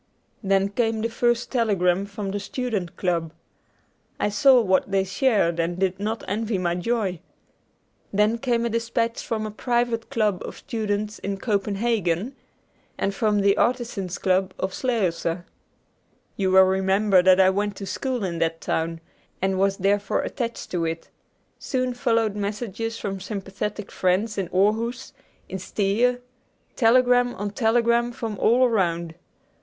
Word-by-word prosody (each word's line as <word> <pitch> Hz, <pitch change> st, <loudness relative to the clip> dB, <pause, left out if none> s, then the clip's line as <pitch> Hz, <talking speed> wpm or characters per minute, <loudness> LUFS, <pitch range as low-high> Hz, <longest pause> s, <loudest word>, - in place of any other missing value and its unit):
Then 195 Hz, -1 st, +2 dB
came 225 Hz, +1 st, 0 dB
the 230 Hz, -, 0 dB
first 240 Hz, +1 st, 0 dB
telegram 200 Hz, -6 st, +1 dB
from 200 Hz, -1 st, -5 dB
the 205 Hz, -, -2 dB
Student 205 Hz, -5 st, -3 dB
Club. 170 Hz, -3 st, -1 dB, 0.9 s
I -, -, +1 dB
saw 245 Hz, +4 st, +5 dB
that 190 Hz, -1 st, +2 dB
they 195 Hz, -1 st, +2 dB
shared 190 Hz, -5 st, +1 dB
and 170 Hz, +1 st, -1 dB
did 190 Hz, 0 st, 0 dB
not 215 Hz, +2 st, -3 dB
envy 215 Hz, +1 st, -1 dB
my 175 Hz, -2 st, 0 dB
joy. 190 Hz, -1 st, -1 dB, 0.9 s
Then 210 Hz, +3 st, +2 dB
came 235 Hz, -2 st, 0 dB
a -, -, 0 dB
dispatch 230 Hz, 0 st, -1 dB
from 220 Hz, -2 st, -2 dB
a 215 Hz, -, -4 dB
private 240 Hz, 0 st, -1 dB
club 210 Hz, -5 st, 0 dB
of -, -, -7 dB
students 210 Hz, -1 st, -3 dB
in 200 Hz, 0 st, -3 dB
Copenhagen, 205 Hz, 0 st, -1 dB, 0.6 s
and 195 Hz, -, -1 dB
from 210 Hz, -1 st, +1 dB
the 200 Hz, 0 st, +4 dB
Artisans' 235 Hz, -7 st, -1 dB
Club 185 Hz, 0 st, +1 dB
of 190 Hz, 0 st, -3 dB
Slagelse. 180 Hz, -8 st, -1 dB, 0.9 s
You 190 Hz, -2 st, 0 dB
will 190 Hz, 0 st, +7 dB
remember 190 Hz, +1 st, +3 dB
that 185 Hz, +1 st, +5 dB
I 190 Hz, 0 st, +6 dB
went 205 Hz, +1 st, -1 dB
to 195 Hz, -, -6 dB
school 255 Hz, +2 st, -3 dB
in 170 Hz, -3 st, -3 dB
that 165 Hz, 0 st, 0 dB
town, 165 Hz, 0 st, -2 dB, 0.4 s
and 190 Hz, 0 st, 0 dB
was 195 Hz, 0 st, +2 dB
therefore 200 Hz, +1 st, +1 dB
attached 235 Hz, -3 st, -4 dB
to 175 Hz, -2 st, -1 dB
it. 165 Hz, 0 st, -4 dB, 0.5 s
Soon 255 Hz, -2 st, -1 dB
followed 230 Hz, -4 st, +1 dB
messages 215 Hz, +2 st, -3 dB
from 195 Hz, -1 st, -4 dB
sympathetic 200 Hz, +1 st, -5 dB
friends 200 Hz, +4 st, 0 dB
in 190 Hz, -, -2 dB
Aarhuus, 225 Hz, +6 st, 0 dB, 0.3 s
in 190 Hz, -, -5 dB
Stege; 215 Hz, +6 st, +1 dB, 0.6 s
telegram 245 Hz, +1 st, +4 dB
on 205 Hz, +1 st, -4 dB
telegram 235 Hz, +1 st, +2 dB
from 225 Hz, -4 st, -5 dB
all 245 Hz, +3 st, +4 dB
around. 170 Hz, -8 st, 0 dB
205 Hz, 145 wpm, -24 LUFS, 190-230 Hz, 0.9 s, will